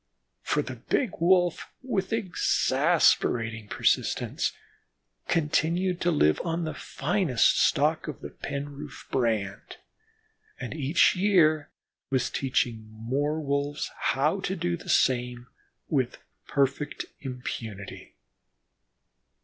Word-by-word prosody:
For - - 0
the - - -7
big 245 -8 0
Wolf, 175 0 +3
with 195 -7 -2
exasperating 140 - +2
persistence, - - 0 0.8
continued 170 +3 +1
to 175 - +2
live 75 - +3
on 170 0 -1
the 155 - -3
finest 155 - +1
stock - - +2
of - - -6
the - - -7
Penroof 145 0 -7
brand, 110 -6 -1 0.8
and 125 - -5
each 155 +4 +3
year 170 -6 +3 0.4
was 130 -2 0
teaching 120 -4 -1
more 135 +8 -2
Wolves 140 0 -2
how 150 +8 +1
to 190 0 -2
do 175 -1 -1
the 170 - -11
same 125 -1 +2 0.4
with 130 -4 0 0.3
perfect 140 +1 0
impunity. 115 -6 -7
145 Hz, 100 wpm, -27 LUFS, 125-170 Hz, 0.8 s, Wolf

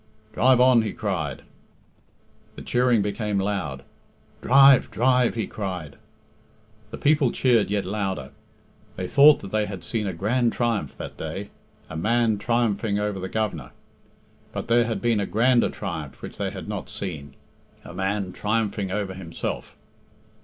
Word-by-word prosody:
"Drive 125 +1 +4
on," 125 -2 +6
he 110 - -3
cried. 85 - -3 1.1
The - - -9
cheering 120 -3 +2
became 105 0 -2
loud. 90 -9 -3 0.6
"Drive, 135 +1 +6
drive," 125 0 +2
he 110 -3 -1
cried. 90 -8 -5 0.9
The 115 - -7
people 145 -4 +3
cheered 120 -6 +2
yet 100 -1 -1
louder. 95 -8 -3 0.6
They 95 -1 -4
thought 145 +6 +6
that 95 - -9
they 105 -1 0
had 100 -4 -7
seen 105 +3 -2
a 95 - -2
grand 115 +7 +1
triumph 115 -3 -1
that - - -8
day 95 +6 -6 0.4
a - - -8
man 110 +4 +1
triumphing 110 -2 0
over 105 -1 -2
the 95 0 -5
Governor. 90 - -3 0.8
But - - -6
there 120 0 +4
had 115 -2 -3
been 115 -3 +2
a 100 - -1
grander 120 +2 +3
triumph 80 -5 -6
which - - -8
they - - -1
had - - -8
not - - -5
seen 80 -7 -6 0.5
a - - -9
man 95 +1 -2
triumphing 105 -2 -1
over 95 0 -2
himself. 90 -3 -6
105 Hz, 150 wpm, -24 LUFS, 95-120 Hz, 1.1 s, on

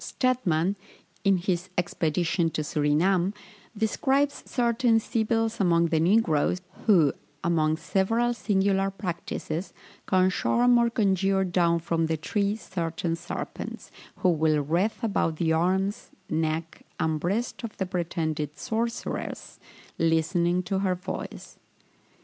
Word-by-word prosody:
Stedman, 200 -8 0 0.5
in 195 -2 +4
his 180 0 -2
Expedition 170 0 0
to 155 - -3
Surinam, 170 +7 +1 0.4
describes 270 +6 +1
certain 235 -2 +2
sibyls 225 0 0
among 170 -3 +3
the 160 - +2
negroes, 175 -2 +2 0.3
who, 170 -10 +5 0.3
among 160 -2 +2
several 225 +8 +1
singular 195 -3 +1
practices, 175 -2 -4 0.3
can 185 -1 +3
charm 245 +5 +3
or 235 0 +3
conjure 195 -3 +2
down 175 -2 +2
from 165 0 0
the 160 0 0
tree 200 +6 0
certain 170 -5 -3
serpents, 175 +2 -6 0.2
who 185 - +2
will 155 -2 +2
wreath 180 - 0
about 195 -7 +1
the 160 0 +1
arms, 190 +5 0 0.2
neck, 160 +1 -2 0.2
and 160 -1 0
breast 210 +10 -2
of 230 - -6
the 190 - -1
pretended 160 -4 -2
sorceress, 230 +7 -4 0.4
listening 170 +2 +2
to 190 +1 -1
her 190 -2 +1
voice. 180 - -7
180 Hz, 120 wpm, -26 LUFS, 165-205 Hz, 0.5 s, who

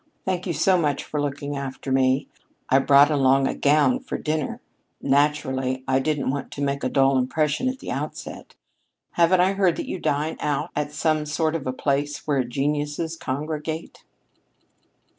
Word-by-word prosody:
Thank 185 0 -2
you 175 - -1
so 185 +2 +3
much 145 -4 0
for 150 - -3
looking 145 0 -3
after 135 -1 -5
me. 130 +1 +2 0.4
I 135 - +5
brought 140 +2 +6
along 135 -1 +3
a - - -1
gown 150 - +3
for 265 - -5
dinner. 155 -2 -2 0.4
Naturally, 135 -3 +1
I 130 0 +3
didn't 145 -1 0
want 140 0 -4
to 145 - -6
make 140 0 -1
a 130 - +1
dull 135 -1 +3
impression 150 - 0
at 260 - -4
the - - -7
outset. - - -6 0.6
Haven't 175 +2 +4
I 190 +2 +3
heard 190 -3 +2
that - - -5
you 185 - -4
dine 150 +1 -1
out 150 +2 -1
at 150 0 -2
some 155 +1 0
sort 155 +1 0
of 155 -5 -3
a - - +1
place 145 +2 -1
where 140 -4 +1
geniuses 145 +5 -2
congregate?" 155 +2 -5
145 Hz, 170 wpm, -24 LUFS, 135-155 Hz, 0.6 s, brought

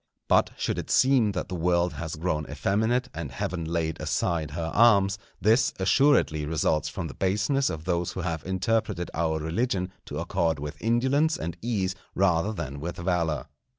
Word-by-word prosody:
But - - +4
should - - -1
it - - -6
seem 130 -6 +4
that 90 - -3
the - - -7
world 85 0 +1
has 80 +2 -5
grown 80 -2 -2
effeminate 110 - 0
and 80 -5 -5
Heaven 85 +6 -3
laid 80 -1 -2
aside 80 0 -1
her 80 +2 -4
arms, 100 -3 +5 0.2
this 115 +4 +3
assuredly 95 - +3
results 80 -1 +1
from - - -5
the - - -6
baseness 105 +9 +1
of 80 0 -5
those 85 -1 -1
who 95 - -4
have 85 -3 -3
interpreted 95 -1 -1
our 80 -1 0
religion 90 +4 -1
to 75 - -6
accord 85 -1 0
with 75 +1 -7
indolence 130 +7 +2
and 85 +1 -4
ease 100 -6 -1 0.2
rather 95 +1 +2
than 70 -9 -5
with 85 +4 -5
valour. 85 -3 0
90 Hz, 170 wpm, -27 LUFS, 80-105 Hz, 0.2 s, arms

